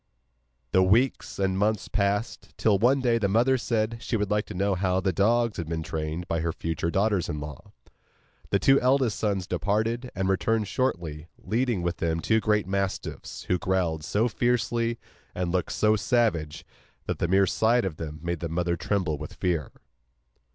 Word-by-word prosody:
The 95 - +4
weeks 115 +8 +2
and 95 -1 0
months 105 0 +1
passed, 100 +2 -2
till 105 -3 +3
one 130 +5 +3
day 120 -2 +2
the 100 - +1
mother 120 +6 +3
said 115 -2 -1
she 115 - -1
would 105 -1 -2
like 105 0 +1
to - - -7
see 95 -1 0
how 95 -1 +2
the 95 -1 0
dogs 115 +4 +2
had 85 -2 -4
been 80 -1 -2
trained 80 +3 -4
by 85 -3 -1
her 85 +1 -1
future 80 0 -3
daughters 100 -1 +1
in 75 - -3
law. 75 -1 -9 0.8
The - - +3
two 135 0 +4
eldest 130 -3 +2
sons 100 -4 0
departed, 110 - -1
and 95 0 -1
returned 105 +3 +1
shortly, 85 - -2
leading 115 -4 -1
with 85 -1 -1
them 85 0 -1
two 110 +6 +2
great 105 -1 +1
mastiffs, 95 0 -3
who 90 - 0
growled 90 -4 0
so 105 +9 +1
fiercely, 120 -1 0 0.4
and 90 -1 -1
looked 90 -1 -1
so 110 0 +3
savage, 85 - 0 0.4
that - - -3
the - - +1
mere 95 +2 +4
sight 115 +5 +2
of 85 -5 -4
them 75 -1 -6
made 85 -1 -2
the 85 - -4
mother 85 +1 0
tremble 85 -3 -1
with 75 - -8
fear. 85 -7 -1
100 Hz, 180 wpm, -26 LUFS, 85-115 Hz, 0.8 s, The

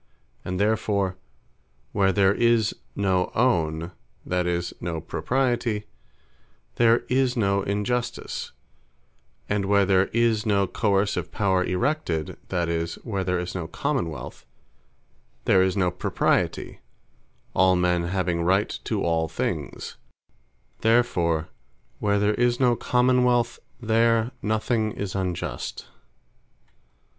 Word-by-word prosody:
And 90 0 -3
therefore 100 -3 +1 0.8
where 95 -1 +3
there 95 0 +3
is 115 -1 +2 0.2
no 95 -2 +1
Own, 85 -9 +1 0.3
that 90 -1 0
is, 85 0 -1
no 85 -1 -3
Propriety, 115 - -1 0.9
there 115 0 +4
is 130 0 +1
no 100 -2 +2
Injustice; 110 +5 -2 1.0
and 100 -1 0
where 100 0 +4
there 95 0 +4
is 115 -2 +1
no 100 -3 +2
coerceive 100 0 0
Power 95 -3 +1
erected, 90 - -1
that 90 -2 0
is, 85 0 -2
where 100 -5 -2
there 90 0 0
is 90 0 -4
no 85 -3 -4
Common 85 - -1
wealth, 75 - -8 1.0
there 95 - +5
is 95 +1 +1
no 90 -2 +2
Propriety; 90 - -1 0.7
all 95 0 +4
men 90 -1 +1
having 90 -1 -1
Right 95 +4 +2 0.2
to - - -1
all 80 -1 +1
things: 80 - -4 0.8
Therefore 90 -9 +2 0.5
where 100 -1 +1
there 105 +1 +2
is 120 +1 +1
no 125 -2 +4
Common 125 +1 +2
wealth, 120 -1 +1 0.2
there 115 0 +2
nothing 110 0 0
is 100 -2 -4
Unjust. 90 -3 -4
100 Hz, 115 wpm, -25 LUFS, 90-115 Hz, 1.0 s, there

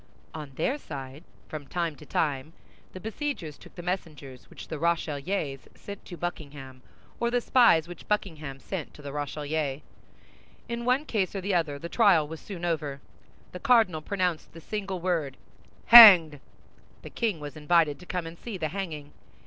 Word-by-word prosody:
On 150 -3 -8
their 260 - -1
side, 140 - -8 0.2
from 150 -3 -8
time 170 0 -2
to - - -14
time, 150 0 -1 0.4
the 185 - -9
besiegers 220 - -4
took - - -17
the 175 - -8
messengers 150 -8 -6
which - - -11
the 155 - -6
Rochellais 155 -2 -1 0.2
sent 200 -1 -10
to 175 - -9
Buckingham, 140 -6 -7 0.4
or 235 - +1
the 245 +1 +1
spies 235 -10 +4
which 175 - -11
Buckingham 155 -10 -3
sent 170 +3 -6
to 150 - -14
the 140 - -6
Rochellais. 145 0 -3 0.8
In 235 0 -4
one 255 +4 +2
case 205 -8 -1
or 195 - -2
the 195 +1 -2
other, 160 -5 0
the 170 - -7
trial 180 -7 +4
was 160 +1 -8
soon 175 -4 -7
over. 150 -5 -2 0.5
The 180 - -8
cardinal 215 -9 +3
pronounced 180 -2 -2
the 165 - -10
single 195 -1 -4
word, 165 -6 -2 0.5
"Hanged!" 185 -11 +10 0.6
The - - -9
king 220 -8 -1
was 145 0 -8
invited 155 -1 +2
to 180 - -14
come 180 -2 -3
and 165 +1 -9
see 225 -5 -6
the 155 -3 -2
hanging. 155 -5 -6
165 Hz, 170 wpm, -27 LUFS, 150-195 Hz, 0.8 s, Hanged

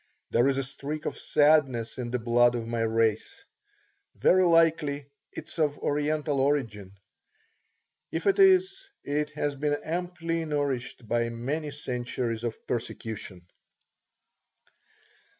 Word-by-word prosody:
There 120 +3 +3
is 135 -1 +1
a 135 - 0
streak 145 +3 -6
of - - -2
sadness 140 -7 +2
in 120 -1 -3
the 125 - -1
blood 120 +1 +3
of 115 -1 -3
my 115 0 -2
race. 110 -1 0 0.7
Very 185 0 +4
likely 160 -4 +3 0.3
it - - -8
is - - -9
of 150 -2 +1
Oriental 150 0 -1
origin. 115 -9 -1 1.1
If - - -3
it 395 0 +3
is, 385 0 +4
it 150 +1 -1
has 145 -1 -1
been 145 +1 -1
amply 165 0 -3
nourished 140 -6 -3
by 120 +1 0
many 140 +7 -3
centuries 125 -4 -3
of 115 -2 -3
persecution. 110 -6 -5
140 Hz, 125 wpm, -27 LUFS, 120-155 Hz, 1.1 s, Very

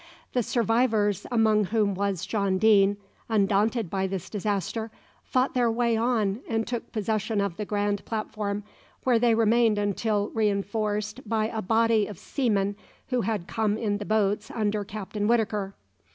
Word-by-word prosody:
The 250 - +2
survivors, 225 -4 +1
among 220 -3 +3
whom 210 +1 +1
was 190 -2 -1
John 195 -1 0
Deane, 200 -1 +4 0.3
undaunted 210 +1 +2
by 190 -1 0
this 190 -2 -5
disaster, 210 +2 -2 0.3
fought 255 +1 +1
their 245 -2 +2
way 235 0 +1
on 220 -3 +1
and 225 -1 0
took 240 -2 -5
possession 215 0 -1
of 200 -4 -1
the 210 - -4
grand 205 -1 -1
platform, 210 -2 -3 0.4
where 245 -3 +3
they 235 -1 +4
remained 225 -1 +3
until 205 +1 0
reinforced 210 +2 -1
by 220 -1 +1
a 220 -2 -3
body 225 +1 +2
of 205 - -8
seamen 205 - -1 0.3
who 250 -2 +1
had 215 -6 -2
come 215 0 0
in 205 -2 -1
the 205 - -5
boats 210 0 +1
under 210 -2 -1
Captain 205 0 -4
Whitaker. 215 -4 0
215 Hz, 150 wpm, -26 LUFS, 200-225 Hz, 0.4 s, Deane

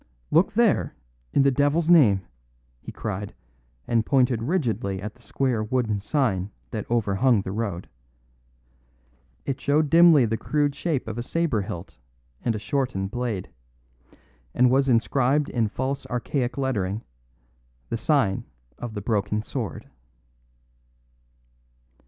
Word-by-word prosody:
"Look 170 +5 +4
there, 205 - +2 0.4
in 140 - +3
the 140 - +4
devil's 145 +5 +1
name!" 130 - +6 0.6
he - - -8
cried, 100 +2 -5 0.5
and 115 -2 +2
pointed 125 -3 +2
rigidly 115 - -1
at 105 +2 -6
the 120 - -24
square 125 -3 -1
wooden 110 -2 0
sign 105 - 0 0.2
that 105 -2 -5
overhung 115 0 +2
the 95 - -5
road. 100 -4 -3 1.6
It 135 -2 -3
showed 145 +1 +2
dimly 165 -6 +7
the 110 0 -1
crude 145 +5 0
shape 150 -5 -2
of 110 +1 -4
a - - -1
sabre 145 -4 0
hilt 90 -5 -7 0.4
and 115 - 0
a - - -2
shortened 105 -3 -2
blade; 115 -6 -3 1.0
and 125 0 +4
was 135 +1 +3
inscribed 130 +4 +2
in 115 -3 0
false 130 +5 -3
archaic 125 +2 -2
lettering, 110 -6 -1 0.9
"The 115 - -1
Sign 120 -8 +1 0.3
of 120 -2 -6
the 105 - -3
Broken 105 0 -1
Sword." - - -5
120 Hz, 130 wpm, -25 LUFS, 105-140 Hz, 1.6 s, dimly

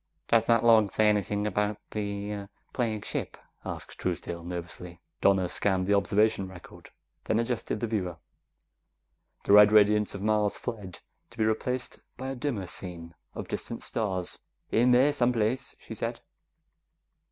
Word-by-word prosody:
"Does 115 -1 +4
that 115 -1 +4
log 110 -3 +6
say 110 - +3
anything 105 0 0
about 105 0 0
the 100 -1 -4 0.2
plague 110 -4 -1
ship?" - - -4 0.3
asked - - -7
Truesdale 85 -1 -3
nervously. 85 0 -6 0.2
Donna 95 -2 +4
scanned 95 0 +1
the 100 - +2
observation 100 0 +2
record, 95 -2 -13 0.4
then 110 - +1
adjusted 115 -2 -2
the - - +1
viewer. 95 -7 -2 1.3
The - - +3
red 105 0 +9
radiance 105 -1 +4
of 100 - -6
Mars 105 -1 +2
fled, 105 -7 -6 0.3
to 120 - -17
be 110 - +2
replaced 120 +3 -2 0.2
by 130 +1 -5
a 135 - -3
dimmer 125 -7 -2
scene 85 -2 -7 0.2
of - - -5
distant - - -4
stars. 95 -5 -1 0.3
"In 120 +3 +4
there 130 +4 +5
someplace," 125 -1 0
she - - -9
said. - - -4
105 Hz, 145 wpm, -28 LUFS, 95-115 Hz, 1.3 s, red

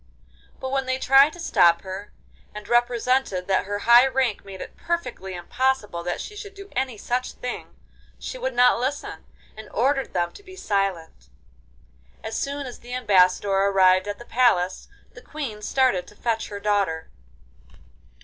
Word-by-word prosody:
But 260 - -4
when 270 -1 -1
they 260 0 0
tried 270 +3 +5
to 350 - -12
stop 170 - +3
her, 190 +2 -7 0.4
and 210 0 -8
represented 240 -4 +1
that 190 0 +1
her 205 +1 -3
high 240 +3 +8
rank 260 -5 0
made 195 -1 -10
it - - -9
perfectly 335 - -4
impossible 210 0 -1
that 175 0 -3
she 420 - -7
should 410 -1 -9
do 395 0 -11
any 260 -3 -1
such 245 +4 -2
thing, 250 - -7 0.4
she - - -7
would - - -3
not 245 -1 +5
listen, 270 +4 -4 0.3
and 220 0 -11
ordered 270 +4 0
them 175 0 0
to - - -14
be 375 -2 -13
silent. 190 - -2 0.9
As 220 0 -5
soon 280 0 -3
as 250 - -9
the 245 +1 -7
ambassador 195 -4 +3
arrived 195 -1 +4
at 205 0 -4
the 240 - -12
palace, 205 -8 +1 0.3
the - - -13
Queen 270 -9 -6
started 225 -7 +1
to 210 - -16
fetch 225 +1 -2
her 205 - -7
daughter. 200 -6 -1
230 Hz, 165 wpm, -24 LUFS, 195-265 Hz, 0.9 s, high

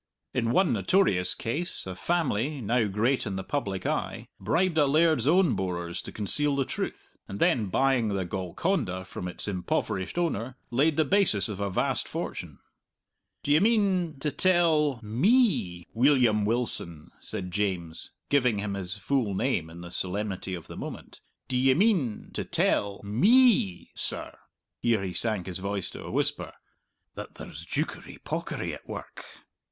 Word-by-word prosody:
In 115 -2 0
one 175 +1 +3
notorious 100 - +3
case 155 +10 -3
a 95 - -5
family, 145 - -1
now 115 0 +1
great 110 +6 +1
in 100 - -3
the 95 - -3
public 100 -9 -3
eye, - - -2
bribed 160 - +1
a 145 - +5
laird's 155 -3 +3
own 175 -2 +4
borers 85 -2 -3
to - - -9
conceal 140 +8 +1
the 135 -1 +1
truth, - - -5
and 100 - -6
then 110 -5 +3
buying 130 +3 +2
the 100 -3 -1
Golconda 95 - -2
from 90 - -6
its 90 - -4
impoverished 95 - -2
owner, 130 -7 -1
laid 145 +5 +2
the 155 - +4
basis 140 - +3
of 100 -2 -5
a 100 0 -1
vast 90 - 0
fortune. - - -5 0.9
"D'ye 145 +2 +4
mean 195 -7 +2
to 150 0 0
tell 160 -8 +3
me, 120 - +2
Weelyum 120 -4 +4
Wilson," 105 -8 -1
said 90 -1 -6
James, 90 -4 -3 0.2
giving 125 -6 +3
him 100 0 -2
his 95 0 -4
full 115 -3 0
name 95 -8 0
in 85 +1 -10
the 85 0 -9
solemnity 95 0 -2
of 85 - -9
the - - -10
moment, - - -8 0.3
"d'ye 130 +1 +3
mean 175 - +1
to - - -2
tell 100 -1 0
me, 190 - +3
sir" - - -3 0.4
here 115 -4 +1
he 95 -2 -3
sank 110 -5 0
his 95 -1 -4
voice 100 -1 -3
to - - -9
a - - -7
whisper - - -1 0.6
"that - - -8
there's - - -9
joukery - - -4
pawkery - - -3
at - - -11
work?" - - -8
115 Hz, 155 wpm, -27 LUFS, 95-150 Hz, 0.9 s, a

